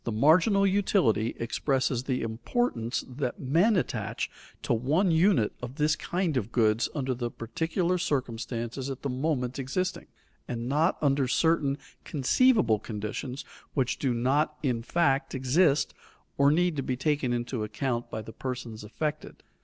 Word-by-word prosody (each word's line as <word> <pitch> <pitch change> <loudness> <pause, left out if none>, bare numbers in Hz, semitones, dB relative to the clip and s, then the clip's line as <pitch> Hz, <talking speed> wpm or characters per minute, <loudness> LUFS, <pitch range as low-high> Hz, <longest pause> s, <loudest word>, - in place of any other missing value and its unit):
The 115 - -2
marginal 165 - +4
utility 190 - +2
expresses 130 +1 0
the 130 -2 -1
importance 115 - -1
that 125 -1 -4
men 170 - +3
attach 170 -9 -2 0.3
to - - +1
one 150 - +2
unit 160 - +3
of 125 +2 -6
this 150 0 +2
kind 175 -5 -1
of 115 -2 -2
goods 110 -1 +2
under 135 -3 -1
the 120 -1 -3
particular 170 - -1
circumstances 120 -4 -2
at 135 - -6
the 140 - -1
moment 130 -1 -1
existing, 180 +8 -2 0.4
and 120 -1 -4
not 155 +6 +2
under 140 -2 +2
certain 145 -1 +2 0.3
conceivable 145 - +3
conditions 110 +6 -5 0.3
which 130 -2 0
do 135 - +1
not 135 +6 +1
in 125 -5 0
fact 140 +1 +1
exist 140 +4 +2 0.4
or 140 0 +4
need 175 +2 +2
to - - 0
be 130 -1 -2
taken 140 -2 0
into 120 -1 -2
account 120 +3 -2
by 110 - -5
the 110 - -10
persons 120 -4 -5
affected. 150 +8 -4
135 Hz, 145 wpm, -28 LUFS, 120-155 Hz, 0.4 s, marginal